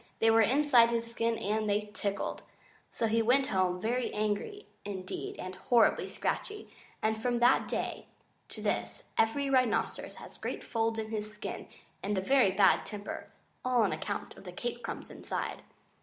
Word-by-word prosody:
They 225 0 +4
were 225 0 +6
inside 250 0 +5
his 230 0 -1
skin 230 0 0
and 215 +1 -1
they 210 +1 0
tickled. 200 -2 -2 0.5
So 230 - -1
he 225 +1 +2
went 255 +4 +4
home, 185 -4 +1
very 240 +5 0
angry 215 - -2 0.2
indeed 190 -2 -5
and 185 0 -6
horribly 225 +5 +3
scratchy; 415 0 -3 0.3
and 220 0 +1
from 245 +1 +1
that 240 +1 +4
day - - -3 0.4
to - - -7
this - - -1
every 250 +6 +2
rhinoceros 255 -3 +1
has - - -11
great - - -4
folds 225 0 0
in 220 0 -4
his 215 -1 -3
skin 210 - -6 0.3
and 205 0 -1
a - - +1
very 260 +1 +4
bad 190 +1 +4
temper, 210 -1 -6 0.4
all 250 -2 +3
on 200 - +2
account 205 - -4
of - - -13
the 180 - -8
cake 240 +6 -4
crumbs 230 - -6
inside. - - -4
225 Hz, 170 wpm, -31 LUFS, 205-240 Hz, 0.5 s, were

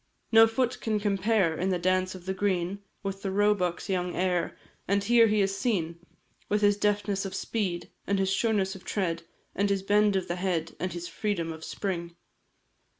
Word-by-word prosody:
No 225 0 +8
foot 245 +2 -1
can 215 -2 0
compare, 200 -3 +2
In 185 +4 -1
the 185 - +1
dance 185 +1 +1
of 180 -1 -11
the 190 - -1
green, 190 -1 -1 0.2
With 195 0 -4
the 195 - -2
roebuck's 190 -3 +1
young 180 -2 -1
heir; 180 -1 0 0.3
And 200 +1 +2
here 230 +1 +5
he 210 -1 +2
is 195 0 +1
seen 180 -6 -1 0.5
With 210 0 +1
his 205 -1 +5
deftness 205 -1 0
of 195 -1 -5
speed, 190 -6 -2 0.2
And 200 - +2
his 195 0 +1
sureness 195 -3 +1
of 190 - -11
tread, 170 -5 -1 0.3
And 200 0 +1
his 195 -1 0
bend 205 0 +3
of 190 - 0
the 175 - -2
head, 175 -3 -1
And 185 - -2
his 175 0 -5
freedom 170 -7 -2
of 160 0 -11
spring! 170 -3 -4
195 Hz, 190 wpm, -28 LUFS, 180-205 Hz, 0.5 s, No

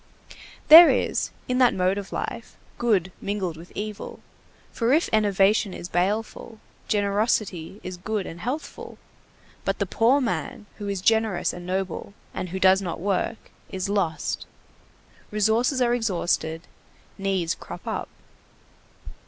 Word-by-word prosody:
There 330 +2 +11
is, - - 0 0.2
in 250 0 0
that 250 -2 +5
mode 185 +2 +1
of 195 - -9
life, 235 -1 -5 0.2
good 200 -7 +1
mingled 195 -4 -2
with 165 +2 -13
evil, 210 0 -6 0.5
for 235 +2 +1
if 320 +3 +3
enervation 205 -1 +3
is 175 - -7
baleful, 215 +4 -2 0.3
generosity 205 -3 0
is 185 0 -6
good 205 +2 -3
and 165 - -8
healthful. 255 - -5 0.7
But - - -1
the - - 0
poor 245 +5 +3
man 230 -3 -3
who 205 - -5
is 200 -2 -2
generous 220 -3 +2
and 175 0 -9
noble, 190 +1 -3 0.2
and 185 - -4
who 190 +2 -4
does 190 +1 +5
not 175 -4 -4
work, 200 +4 -2 0.2
is 190 +1 -3
lost. 170 -7 -1 0.8
Resources 225 +5 +2
are 240 0 +2
exhausted, 175 -7 -1 0.6
needs 190 -4 0
crop - - -10
up. - - -3
200 Hz, 135 wpm, -25 LUFS, 185-225 Hz, 0.8 s, There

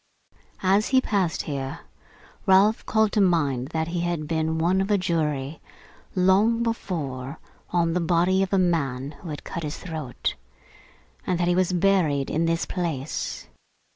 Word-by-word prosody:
As 195 +3 +3
he 260 - +4
passed 195 -9 0
here, 140 0 -4 0.7
Ralph 195 +3 +5
called 220 -1 +3
to 210 - +2
mind 145 -9 +2
that 160 +1 -2
he 175 0 -2
had 170 -3 -2
been 160 0 0
one 175 +4 +2
of 195 - -2
a 205 - +4
jury, 155 -5 -1 0.5
long 200 +5 +3
before, 150 - -3 0.3
on 170 -2 +1
the 180 - +1
body 175 +3 +2
of 195 - -1
a 195 - +3
man 145 -7 0
who 170 - -8
had 150 - -6
cut 170 - -5
his 150 -2 -4
throat; 155 -8 -4 0.9
and 180 -2 0
that 175 - +1
he 175 - +3
was 185 0 +2
buried 175 -7 +2
in 160 +2 +1
this 165 0 0
place. 160 -6 -3
170 Hz, 160 wpm, -25 LUFS, 150-190 Hz, 0.9 s, Ralph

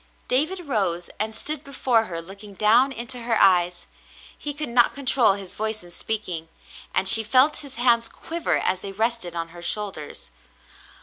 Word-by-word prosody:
^' - - -35
David 315 +9 0
rose 195 - -2
and 220 +1 -3
stood 300 +5 -3
before 255 -5 0
her 165 -3 -6
looking 200 +3 -12
down 230 +7 +3
into 245 0 -4
her 230 -1 -1
eyes. 180 -2 +3 0.5
He 295 - -5
could 295 +1 -5
not 240 0 +3
control 260 -6 +3
his 195 -2 -8
voice 220 -2 -3
in 175 - -15
speaking, 175 -4 -4 0.4
and 190 - 0
she 225 +3 +11
felt 255 +7 +4
his 280 -2 -6
hands 235 -1 +2
quiver 335 0 -3
as 185 - -2
they 195 - -7
rested 220 -4 -2
on 165 0 -4
her 175 +1 -12
shoulders. 185 -4 -4
220 Hz, 175 wpm, -23 LUFS, 185-255 Hz, 0.5 s, she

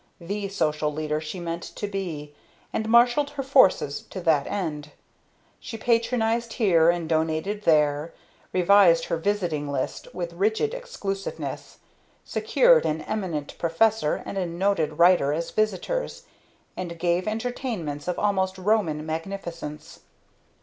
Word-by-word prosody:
The 200 +3 -4
Social 150 -5 0
Leader 150 0 -2
she 155 +4 -6
meant 170 0 -4
to - - -6
be; 170 -7 -5 0.4
and 220 0 -2
marshalled 240 +5 +5
her 285 -1 -5
forces 195 - +4
to 190 - -6
that 160 -5 +2
end. 150 -7 -4 0.7
She 225 - -7
Patronized 230 0 +1
here, 170 -8 +4
and 170 -1 0
Donated 160 +6 -1
there; 150 0 +3 0.4
revised 180 -2 +5
her 170 - -1
visiting 165 -6 -1
list 135 -2 -3
with 170 -1 -5
rigid 220 - 0
exclusiveness; 200 - -5 0.5
secured 485 +2 +4
an 155 +1 -1
Eminent 180 -9 -3
Professor 170 +1 +1
and 195 - -4
a 180 - -1
Noted 170 -3 0
Writer 170 -5 +5
as 165 +2 -3
visitors, 215 - -1 0.5
and 170 -2 -5
gave 175 +2 0
entertainments 215 - -3
of 180 - -1
almost 190 -2 0
Roman 185 -6 +1
magnificence. 165 -2 -6
180 Hz, 130 wpm, -25 LUFS, 160-215 Hz, 0.7 s, marshalled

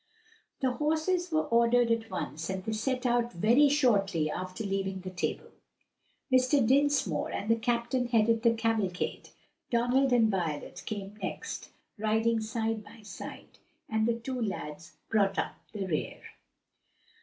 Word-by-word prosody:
The 260 -1 +2
horses 320 +6 0
were 315 0 +2
ordered 235 0 +3
at 230 0 0
once 160 -5 -4
and 190 -1 -3
they 220 - -3
set 250 +4 -1
out 240 -1 +1
very 235 +11 +5
shortly 200 - +2
after 185 +5 -5
leaving 195 -1 -2
the 185 0 -6
table. 180 - -3 0.8
Mr. 255 0 +4
Dinsmore 270 - +2
and 215 +3 -1
the - - +6
captain 240 +2 0
headed 230 -1 +3
the 230 -1 +4
cavalcade, 225 -5 -1 0.4
Donald 250 +3 +2
and 230 -3 +4
Violet 165 -6 -3
came 205 -1 -5
next, 190 - -5 0.3
riding 220 +1 +2
side 220 0 -2
by 215 +1 -15
side, 210 - -9 0.3
and 220 0 +1
the 235 - +2
two 255 +1 -4
lads 155 -7 -5
brought 200 -3 +2
up - - -2
the 200 -3 -3
rear. 160 -5 -2
225 Hz, 145 wpm, -30 LUFS, 195-245 Hz, 0.8 s, the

